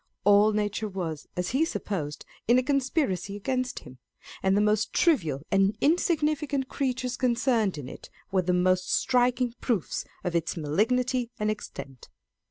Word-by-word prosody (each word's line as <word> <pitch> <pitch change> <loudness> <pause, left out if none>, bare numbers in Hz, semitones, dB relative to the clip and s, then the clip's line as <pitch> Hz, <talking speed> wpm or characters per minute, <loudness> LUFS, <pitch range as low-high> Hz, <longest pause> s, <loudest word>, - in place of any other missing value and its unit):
All 205 +2 +6
nature 210 +1 -1
was, 170 -6 -5
as 180 0 -1
he 270 +5 +2
supposed, 170 - -3 0.2
in 240 +2 +5
a 255 - +3
conspiracy 265 - 0
against 255 +4 -2
him, 130 - -14 0.4
and 190 +1 +2
the - - +4
most 210 +1 +1
trivial 165 - +2
and 195 +2 +3
insignificant 300 -3 +1
creatures 255 -2 -2
con 250 -2 +1
cerned 225 - +1
in 140 -4 -6
it - - -10 0.2
were 190 -1 +3
the 180 0 0
most 185 +1 +2
striking 245 -1 +2
proofs 220 -10 -1 0.2
of 175 -1 -2
its 165 0 -1
malignity 240 - +1
and 210 0 +1
extent. 135 - -8
215 Hz, 155 wpm, -27 LUFS, 185-255 Hz, 0.4 s, All